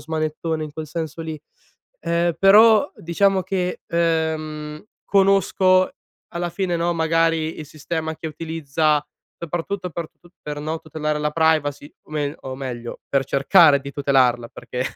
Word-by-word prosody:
smanettone 155 +1 -3
in 150 - -9
quel 155 0 -7
senso 160 0 -5
lì, 160 -2 -6 0.6
ehm, 170 0 0
però 215 - +6
diciamo 190 +3 +1
che, 180 -2 -2
ehm, 160 -2 -1 0.2
conosco, 195 -1 +3 0.4
alla 175 0 -2
fine, 185 -1 -2
no, 170 +1 0
magari 165 -1 +1
il - - -6
sistema 160 +2 -4
che 160 - -7
utilizza 155 -1 -1 0.3
soprattutto 175 +3 -4
per 165 0 -5
tut 175 0 -21
per, 150 -1 -5
no, 155 +2 -3
tutelare 150 -1 -3
la 150 0 0
privacy. 155 -2 0
O - - -22
mel 150 -1 -2
o 130 -1 -6
meglio, 120 -3 -6
per 135 -1 +1
cercare 140 +3 +5
di 140 0 -8
tutelarla, 130 -4 +2
perché 125 +1 -5
160 Hz, 145 wpm, -22 LUFS, 150-170 Hz, 0.6 s, però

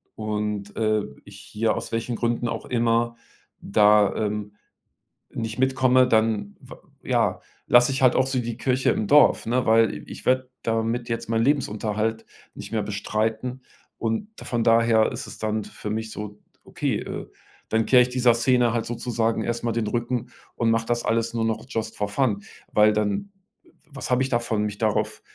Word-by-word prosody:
und, 105 -1 -3
äh, 110 -1 +1 0.2
ich 100 -1 -13
hier, 110 +2 -1
aus - - -5
welchen 115 +1 -2
Gründen 120 +1 -1
auch - - -4
immer, 115 -1 +1 0.4
da, 105 0 +4
ähm, 105 -1 -3 0.8
nicht 115 0 -5
mitkomme, 130 -1 +4
dann 110 -3 +1
wa - - -13 0.2
ja, - - +1 0.3
lasse 120 +1 +5
ich 135 - -2
halt 130 -2 +5
auch 130 - +3
so 135 -1 -1
die 120 -2 -3
Kirche 130 +1 +1
im 105 - -1
Dorf, 150 0 +5
ne? 125 +2 0
Weil, 110 -1 +2
ich - - -9
werde 130 0 +2
damit 115 +1 -1
jetzt 115 - -3
meinen 115 0 +1
Lebensunterhalt 110 -4 -1 0.3
nicht - - -9
mehr 110 -2 0
bestreiten. 110 +4 -2 0.4
Und 115 - -2
von 120 -2 -2
daher 115 -1 +4
ist - - -6
es - - -9
dann 110 -1 -2
für 105 - -7
mich 110 +1 -3
so 105 0 -7 0.2
okay, - - -2
äh, - - -6 0.4
dann 110 0 +1
kehre 125 - +6
ich 125 - 0
dieser 125 -1 +4
Szene 120 0 +2
halt 115 -1 -1
sozusagen 115 -1 -1
erst 120 0 -3
mal 115 - 0
den 115 -1 -1
Rücken 120 +1 -2 0.2
und 115 -1 +1
mach 115 0 +1
das 120 +1 -1
alles 115 0 0
nur 115 -1 0
noch 115 +1 -2
just 110 -2 -4
for 105 - -2
fun, 105 -2 0 0.3
weil 105 0 +5
dann 105 - -1 0.6
was 135 -3 -7
habe 125 +1 +3
ich 130 - -2
davon, 120 -3 0
mich 105 -1 -3
darauf 110 -2 0
115 Hz, 180 wpm, -24 LUFS, 110-120 Hz, 0.8 s, kehre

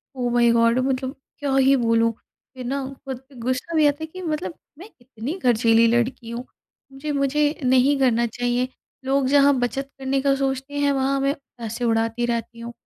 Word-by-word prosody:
ओ 245 -1 -1
माई 240 -1 +4
God 230 +1 +3
मतलब 260 +1 -2 0.2
क्या 280 -2 -1
ही 270 +1 +5
बोलूँ। 230 -2 +2
फ़िर 255 +3 -14
ना 275 +2 -2 0.2
खुद 265 -2 -4
पे 275 - -18
गुस्सा 255 +7 -2
भी 310 -1 +4
आता 285 - +1
है - - -1
कि 370 +4 -10
मतलब 305 - -3 0.2
मैं 385 +6 -11
कितनी 245 - -7
खरचीली 230 -3 +4
लड़की 240 0 0
हूँ। 235 +2 -5 0.5
मुझे 275 +3 -5
मुझे 280 +1 +1 0.2
नहीं 260 +2 +4
करना 235 -3 +3
चाहिए। 245 +2 -1 0.4
लोग 270 0 +1
जहाँ 285 0 +5
बचत 270 +3 -2
करने 270 0 0
का 275 0 +3
सोचते 270 +1 -2
हैं 285 0 +2
वहाँ 275 0 +1
मैं 275 +1 +2 0.2
पैसे 230 +1 -4
उड़ाती 225 +1 +1
रहती 235 0 -3
हूँ। 235 +1 -7
255 Hz, 185 wpm, -23 LUFS, 235-275 Hz, 0.5 s, ही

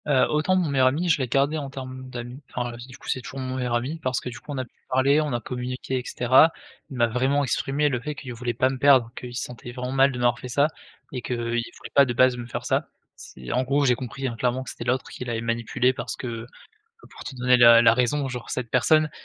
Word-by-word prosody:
Heu, 135 -3 +4
autant 155 +5 +2
mon 180 -4 +1
meilleur 130 -2 +3
ami, 160 +7 0
je 160 - +3
l'ai 130 - -1
gardé 140 +5 +1
en 140 -3 -4
termes 130 -1 -8
d'amis, 125 +2 -7
enfin 120 -1 -3
du 130 - -12
coup, - - -15
c'est 130 - -1
toujours 135 +2 -8
mon 130 0 -3
meilleur 125 -2 -1
ami 135 +7 -2
parce 130 -5 -1
que, - - -6
du 120 +1 -9
coup, 145 - -10
on 140 - -4
a 130 - -2
pu - - -28 0.2
parler, 135 +4 +3
on 150 -2 -2
a 120 - 0
communiqué 125 +2 -4
et - - -6
cetera. 130 +6 +5 0.4
Il 135 - -7
m'a 120 - +4
vraiment 130 +5 +1
exprimé 140 +2 0
le 130 -4 0
fait 150 +4 -5
qu'il 130 -2 -7
voulait 120 0 -3
pas 130 +2 +2
me 130 -1 -5
perdre, 130 -4 +5
qu'il 120 -1 -8
se - - -2
sentait 120 0 -8
vraiment 125 +1 -5
mal 135 +1 +4
de 125 - -6
m'avoir 120 -1 +1
fait - - -7
ça 140 +4 +3 0.4
et 125 - -4
qu'il 125 0 -3
voulait 120 0 -4
pas 140 - +6
de 120 - -2
base 130 +1 +4
me 120 -1 -6
faire - - -5
ça. - - 0 0.3
C'est 65 -1 -10
en 125 - +2
gros, 140 +2 +1
j'ai 125 - +5
compris, 130 +2 -6
hein, 120 - -4
clairement 125 +2 0
que - - -7
c'était 120 - -8
l'autre 125 +1 0
qui - - -7
l'avait 120 -2 -3
manipulé 115 +2 0
parce 120 -1 -5
que, 115 -2 -6 0.6
pour - - -12
te - - -7
donner 125 0 +4
la 115 -1 +8
la 115 - +7
raison, 130 +4 +1
genre 125 -2 -6
cette 125 -3 -3
personne 155 +5 +3
130 Hz, 265 wpm, -25 LUFS, 120-135 Hz, 0.6 s, la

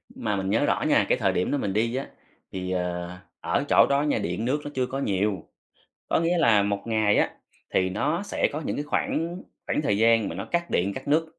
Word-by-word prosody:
mà 105 -1 -2
mình 95 -1 -2
nhớ 110 - +2
rõ - - +1
nha, - - +4
cái - - +3
thời - - +1
điểm 90 - 0
đó 145 - +1
mình 95 -7 -2
đi 115 +3 0
á, 135 - -3 0.4
thì, 90 -1 -4
ờ, 90 -1 -2 0.3
ở - - 0
chỗ - - +6
đó 140 +1 +3
nha, 150 - +1
điện 90 +6 -3
nước 140 +4 0
nó 145 - -5
chưa 130 -1 +1
có 135 +1 -4
nhiều, 100 -6 0 0.7
có - - +3
nghĩa 170 +1 +1
là 110 -9 +4
1 100 0 -1
ngày 110 -2 +2
á, - - +3 0.4
thì 95 0 +2
nó 150 - -1
sẽ - - 0
có 150 - -3
những - - -2
cái 145 - -2
khoảng 170 +4 -2 0.2
khoảng - - 0
thời 105 -9 +1
gian 115 -1 +3
mà 80 - -6
nó 100 - -5
cắt 170 +6 -2
điện, 95 +3 0
cắt 130 - -8
nước. 155 +3 +3
115 Hz, 245 wpm, -26 LUFS, 100-145 Hz, 0.7 s, chỗ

